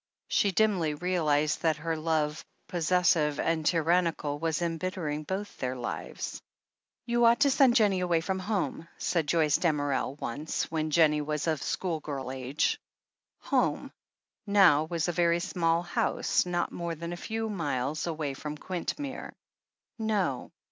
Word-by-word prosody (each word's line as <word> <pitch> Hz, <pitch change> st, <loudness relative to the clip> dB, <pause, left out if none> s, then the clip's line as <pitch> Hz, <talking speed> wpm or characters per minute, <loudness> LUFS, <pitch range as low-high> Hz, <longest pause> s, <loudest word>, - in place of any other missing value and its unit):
She 200 Hz, -, +3 dB
dimly 185 Hz, -6 st, +2 dB
realized 155 Hz, -3 st, +1 dB
that 160 Hz, -2 st, +2 dB
her 165 Hz, +1 st, -2 dB
love, 155 Hz, -1 st, -1 dB, 0.2 s
possessive 165 Hz, -3 st, +2 dB
and 165 Hz, -1 st, 0 dB
tyran 170 Hz, +2 st, +3 dB
nical, 145 Hz, -2 st, -5 dB
was 160 Hz, -1 st, 0 dB
embittering 165 Hz, -2 st, -2 dB
both 190 Hz, +6 st, -4 dB
their 130 Hz, 0 st, -2 dB
lives. 120 Hz, -1 st, -5 dB, 0.6 s
"You 240 Hz, 0 st, +2 dB
ought 235 Hz, +2 st, +5 dB
to 285 Hz, -1 st, +5 dB
send 260 Hz, -3 st, +5 dB
Jennie 205 Hz, -6 st, +4 dB
away 175 Hz, -2 st, +2 dB
from 190 Hz, +3 st, -2 dB
home," 185 Hz, -4 st, -2 dB
said 165 Hz, -4 st, 0 dB
Joyce 155 Hz, -2 st, +3 dB
Damerel 145 Hz, -5 st, 0 dB
once, 150 Hz, +8 st, -3 dB
when 155 Hz, -1 st, -1 dB
Jennie 150 Hz, -1 st, +4 dB
was 150 Hz, 0 st, -2 dB
of 160 Hz, -4 st, 0 dB
schoolgirl 150 Hz, -7 st, -3 dB
age. 130 Hz, +2 st, -1 dB, 0.6 s
"Home" -, -, 0 dB, 0.6 s
now 185 Hz, -7 st, +5 dB
was 165 Hz, 0 st, -1 dB
a -, -, +1 dB
very 170 Hz, 0 st, +2 dB
small 170 Hz, -2 st, +1 dB
house, 175 Hz, +1 st, 0 dB
not 175 Hz, -1 st, -1 dB
more 170 Hz, -1 st, -4 dB
than 170 Hz, +2 st, -5 dB
a 175 Hz, -, -7 dB
few 225 Hz, 0 st, -1 dB
miles 150 Hz, -, -2 dB
away 155 Hz, -4 st, -2 dB
from 150 Hz, +2 st, -6 dB
Quintmere. 190 Hz, -, -4 dB, 0.7 s
"No." 205 Hz, -, -1 dB
165 Hz, 145 wpm, -29 LUFS, 150-180 Hz, 0.7 s, ought